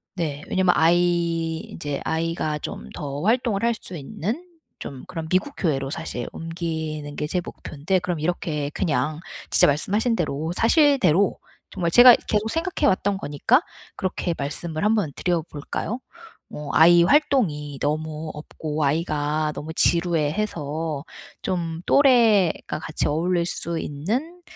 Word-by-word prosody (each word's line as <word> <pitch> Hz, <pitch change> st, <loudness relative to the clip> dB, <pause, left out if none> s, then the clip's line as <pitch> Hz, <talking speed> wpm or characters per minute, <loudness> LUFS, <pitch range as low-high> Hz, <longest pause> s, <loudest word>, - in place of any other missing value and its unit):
네. 150 Hz, -5 st, -3 dB
왜냐면 185 Hz, -1 st, +3 dB
아이 170 Hz, 0 st, +2 dB
인제 145 Hz, -4 st, -5 dB
아이가 160 Hz, -1 st, -1 dB
좀 65 Hz, -, -7 dB
더 140 Hz, 0 st, -5 dB
활동을 225 Hz, +1 st, +1 dB
할 235 Hz, 0 st, +3 dB
수 185 Hz, -, -7 dB
있는 190 Hz, -, -4 dB, 0.4 s
좀 135 Hz, -2 st, -8 dB
그런 165 Hz, -3 st, -5 dB
미국 185 Hz, -, +1 dB
교회로 135 Hz, -6 st, 0 dB
사실 140 Hz, -5 st, -5 dB
옮기는 160 Hz, -3 st, -5 dB
게 150 Hz, -, -3 dB
제 180 Hz, +4 st, -1 dB
목푠데 160 Hz, +6 st, -2 dB
그럼 175 Hz, -1 st, -3 dB
이렇게 155 Hz, -3 st, -2 dB
그냥 155 Hz, -1 st, -1 dB, 0.3 s
진짜 -, -, +6 dB
말씀하신 205 Hz, -, +1 dB
대로 160 Hz, -3 st, -2 dB
사실대로 235 Hz, -, +3 dB, 0.3 s
정말 170 Hz, -2 st, -2 dB
제가 245 Hz, +4 st, +9 dB
계속 215 Hz, +1 st, +1 dB
생각해 330 Hz, +7 st, 0 dB
왔던 195 Hz, +1 st, +1 dB
거니까 195 Hz, -, +2 dB, 0.4 s
그렇게 185 Hz, -2 st, -2 dB
말씀을 155 Hz, +3 st, -4 dB
한번 210 Hz, -8 st, +2 dB
드려 175 Hz, -2 st, 0 dB
볼까요? 155 Hz, -, -4 dB, 0.5 s
뭐 150 Hz, -1 st, -7 dB
"아이 170 Hz, +1 st, +7 dB
활동이 175 Hz, -, +2 dB
너무 155 Hz, +1 st, -2 dB
없고 150 Hz, 0 st, -4 dB
아이가 150 Hz, 0 st, 0 dB
너무 160 Hz, +2 st, -6 dB
지루해해서 160 Hz, -3 st, 0 dB, 0.4 s
좀 170 Hz, -3 st, -3 dB
또래가 230 Hz, -, +4 dB
같이 155 Hz, 0 st, -3 dB
어울릴 170 Hz, +3 st, +1 dB
수 170 Hz, -1 st, -3 dB
있는 240 Hz, -, -3 dB
165 Hz, 285 characters per minute, -23 LUFS, 150-190 Hz, 0.5 s, 제가